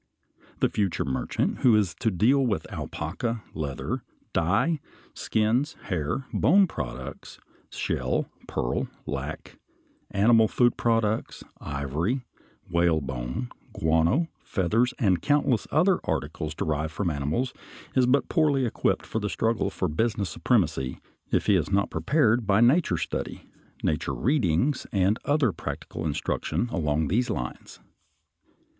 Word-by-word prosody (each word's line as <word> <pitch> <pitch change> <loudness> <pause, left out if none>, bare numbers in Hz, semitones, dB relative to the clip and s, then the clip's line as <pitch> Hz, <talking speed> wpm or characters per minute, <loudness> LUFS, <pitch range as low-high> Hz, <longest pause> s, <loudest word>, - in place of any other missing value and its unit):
The - - +4
future 100 -4 0
merchant 65 -1 -1
who 120 -4 +5
is 100 -5 +2
to 115 - +2
deal 110 +9 +3
in 100 - +1
alpaca, 115 +8 -3
leather, 70 -4 -3 0.3
dye, 125 - +2 0.3
skins, 115 +7 +1 0.2
hair, 90 - -1
bone 195 +7 +5
products, 75 - -7 0.3
shell, 65 -1 -1 0.2
pearl, - - -1 0.2
lac, - - -5 0.5
animal 110 +2 +5
food 120 +3 +3
products, 115 -2 0 0.2
ivory, 80 - -2 0.4
whalebone, 70 -9 0 0.2
guano, 80 - +2
feathers, 110 +6 +1
and 95 -6 +2
countless 145 -6 +2
other 175 +5 +3
articles 80 +1 -2
derived 75 0 -1
from 85 +1 -1
animals 75 - -1 0.4
is 130 -2 +4
but 140 +3 +3
poorly 145 -5 +2
equipped 115 - 0
for 110 - -2
the 105 -1 -2
struggle 115 +2 0
for 90 - -2
business 100 +2 -1
supremacy 65 0 +1 0.3
if - - +1
he - - +4
is - - +1
not 100 0 +2
prepared 120 -7 +2
by 100 0 +4
nature 120 - +4
study, - - -4 0.4
nature 75 - 0
readings, 130 - +1
and 100 +3 +2
other 145 -5 +3
practical 80 -1 -5
instruction 80 +9 -1
along 75 -6 0
these 120 - +1
lines. 60 0 -5
105 Hz, 125 wpm, -26 LUFS, 80-125 Hz, 0.5 s, who